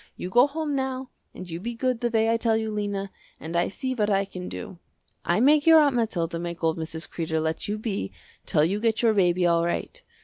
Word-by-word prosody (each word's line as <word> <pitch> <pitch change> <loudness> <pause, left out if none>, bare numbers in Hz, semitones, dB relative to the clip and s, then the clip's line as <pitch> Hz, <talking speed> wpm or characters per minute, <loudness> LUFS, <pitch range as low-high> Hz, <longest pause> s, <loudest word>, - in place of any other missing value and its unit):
You 180 - -6
go 245 +5 +6
home 300 0 -3
now 265 -1 -3 0.2
and 185 - -9
you 165 -1 -5
be 235 +5 -5
good 255 0 -1
the 240 - +1
way 225 0 +2
I 230 - +2
tell 225 -1 +1
you 220 -1 -2
Lena, 205 -2 -3 0.3
and 165 +1 -6
I 170 - +2
see 260 +6 -3
what 215 -4 0
I 195 -1 +2
can 180 -2 -7
do. 195 -6 -8 0.4
I 175 - +1
make 290 +5 +4
your 325 -1 +9
Aunt 285 -4 +3
Mathilda 170 -8 -1
make 170 0 -6
old 160 0 +1
Mrs. 160 0 -5
Kreder 160 -1 -2
let 160 0 -2
you 210 +1 -2
be 210 - -3 0.4
till 150 - +3
you 195 +5 0
get 225 +1 0
your 225 -2 +4
baby 180 -3 +2
all 170 -1 +3
right. 325 - -3
210 Hz, 235 wpm, -25 LUFS, 175-240 Hz, 0.4 s, your